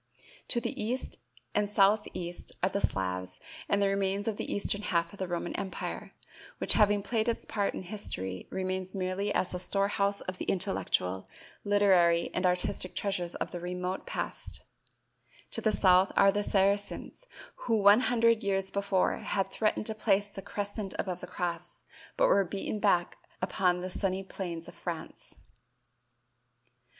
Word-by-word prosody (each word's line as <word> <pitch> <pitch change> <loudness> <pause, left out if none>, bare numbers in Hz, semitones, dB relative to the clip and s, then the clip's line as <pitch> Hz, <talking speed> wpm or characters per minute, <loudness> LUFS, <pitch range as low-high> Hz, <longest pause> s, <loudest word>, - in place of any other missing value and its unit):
To 240 - +5
the - - -3
east 250 +4 -3 0.3
and 210 -1 +1
southeast 195 -4 +1
are 185 - +4
the 200 +1 -2
Slavs 90 -1 -2 0.3
and 200 - +3
the 200 - +3
remains 195 +1 0
of 215 -2 -1
the - - -3
eastern 205 0 +2
half 170 -3 0
of 200 - -13
the 190 - -2
Roman 175 -1 -3
empire, 195 -1 -5 0.4
which - - +3
having 205 -2 +4
played 225 +1 0
its 230 - -2
part 205 -2 -1
in - - -5
history, 95 - -4
remains 185 0 -3
merely 190 +2 -1
as 185 - 0
the 180 - -3
storehouse 200 +1 +1
of 185 0 -6
the - - -3
intellectual, 175 - -1 0.4
literary 185 -5 +4
and 185 0 +2
artistic 180 0 +1
treasures 180 -4 -2
of - - -3
the 175 - -5
remote 180 +1 -4
past; - - -4 0.9
to - - -2
the 220 - +2
south 185 -2 +5
are 195 - +7
the 205 +1 0
Saracens 200 - 0 0.4
who 230 - +3
one 205 +1 +7
hundred 230 -2 +3
years 195 -1 0
before 200 -2 +1
had 195 -1 -1
threatened 215 -1 0
to 220 - +3
place 205 -2 +1
the 195 - -8
crescent 205 0 -4
above 185 -3 -3
the 180 - -7
cross, 175 -1 -4 0.3
but - - +5
were 200 - +5
beaten 195 +3 -4
back 180 -4 +2 0.2
upon 180 -1 +1
the 185 - -4
sunny 190 0 -1
plains 175 -4 -6
of - - -10
France. 170 -3 -7
195 Hz, 160 wpm, -30 LUFS, 180-205 Hz, 0.9 s, are